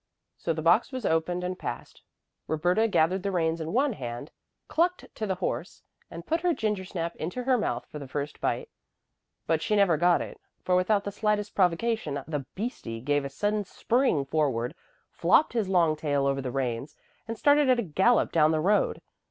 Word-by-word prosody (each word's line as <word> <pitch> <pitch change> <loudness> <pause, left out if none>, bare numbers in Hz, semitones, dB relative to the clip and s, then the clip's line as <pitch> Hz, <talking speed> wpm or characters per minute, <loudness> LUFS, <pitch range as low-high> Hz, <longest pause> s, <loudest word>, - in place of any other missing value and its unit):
So 170 - -2
the 155 -1 -3
box 175 - +4
was 255 -5 -5
opened 175 +2 0
and 180 0 -3
passed. - - -6 0.5
Roberta 175 +8 +2
gathered 185 -2 +2
the 200 - -2
reins 165 -2 0
in 160 +1 -4
one 265 +3 +2
hand, 120 - -6 0.4
clucked 355 +2 +1
to 215 - -4
the 190 - 0
horse, 180 -1 -4 0.3
and 170 +1 -9
put 330 +1 0
her 350 -2 +2
gingersnap 190 -5 -2
into 180 +11 -4
her 260 0 +3
mouth 225 - -1
for 150 - -9
the 140 - -8
first 145 +2 -5
bite. - - -1 0.8
But 160 -1 +1
she 210 - 0
never 195 -6 +4
got 175 +2 +4
it, - - -7 0.2
for 180 - +2
without 200 +3 +2
the 200 - -4
slightest 210 0 -1
provocation 180 -4 +1
the 145 -5 -4
"beastie" 195 - -4
gave 145 +4 0
a - - -3
sudden 205 +9 -1
spring 220 - +1
forward, 135 -4 0 0.4
flopped 310 - +3
his 220 -5 0
long 170 -4 +3
tail 145 -2 0
over 135 0 +1
the 130 - -3
reins, 125 +1 -3 0.3
and 230 0 -4
started 290 +1 +4
at 255 - +5
a 235 - 0
gallop 190 +7 +2
down 155 -2 +4
the 160 0 +1
road. 200 +6 +1
180 Hz, 190 wpm, -27 LUFS, 155-215 Hz, 0.8 s, at